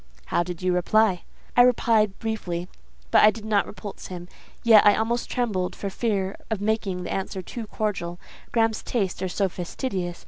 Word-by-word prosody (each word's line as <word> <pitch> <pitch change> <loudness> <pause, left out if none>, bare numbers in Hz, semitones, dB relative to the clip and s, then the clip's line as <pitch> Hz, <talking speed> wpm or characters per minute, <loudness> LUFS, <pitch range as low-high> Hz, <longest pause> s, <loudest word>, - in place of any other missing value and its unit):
"How - - +4
did 175 0 -5
you 185 0 +2
reply?" 185 +1 +2 0.3
"I 245 - +7
replied 225 -4 +3
briefly, 180 -6 -3 0.4
but - - +6
I 215 - +8
did 215 0 -6
not 210 -2 +2
repulse 205 -1 -8
him. 175 -1 -7 0.4
Yet 225 -3 +8
I 205 - +6
almost 235 +2 -1
trembled 205 -7 -1
for 200 - -4
fear 195 -3 -1
of 220 -3 -1
making 205 -3 -1
the - - -4
answer 190 0 -3
too 225 +4 -7
cordial: 185 -6 -3 0.3
Graham's 225 -2 +2
tastes 195 -7 -2
are 185 - -1
so 195 +2 +1
fastidious. 180 0 -4
205 Hz, 175 wpm, -25 LUFS, 180-220 Hz, 0.4 s, I